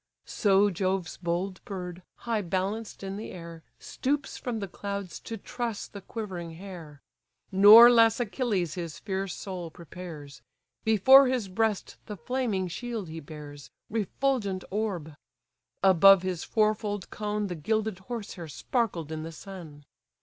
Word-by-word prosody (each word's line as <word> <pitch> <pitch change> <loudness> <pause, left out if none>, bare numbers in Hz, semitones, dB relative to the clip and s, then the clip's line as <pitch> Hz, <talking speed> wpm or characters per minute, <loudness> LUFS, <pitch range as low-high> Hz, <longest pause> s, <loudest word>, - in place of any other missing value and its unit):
So 205 -1 +3
Jove's 185 -1 -2
bold 180 +2 -3
bird, 180 -3 -6 0.2
high 230 -3 0
balanced 195 +4 -3
in 195 0 -4
the 215 - -6
air, 170 -2 -9 0.2
Stoops 285 +2 -2
from 245 -3 -4
the 200 - -4
clouds 200 0 -5
to 225 - -6
truss 235 0 -4
the 200 - -10
quivering 180 -6 -6
hare. 165 -6 -10 0.5
Nor 210 +5 +10
less 230 -1 +5
Achilles 210 - -1
his 170 -2 -5
fierce 195 -2 -3
soul 180 -4 -6
prepares: 155 -5 -10 0.4
Before 260 +6 +7
his 250 -5 0
breast 215 +1 -1
the 210 -2 -6
flaming 235 -7 -1
shield 225 0 -5
he 160 +1 -6
bears, 145 -1 -10 0.2
Refulgent 215 -2 -1
orb! 190 -7 -2 0.7
above 190 0 +7
his 185 -3 -2
fourfold 215 -2 0
cone 210 0 -2
The 185 - -3
gilded 215 +4 -1
horse 220 +1 -6
hair 170 -3 -8
sparkled 170 - -2
in 155 0 -4
the 165 +1 -6
sun. 160 -5 -10
195 Hz, 140 wpm, -28 LUFS, 175-220 Hz, 0.7 s, Nor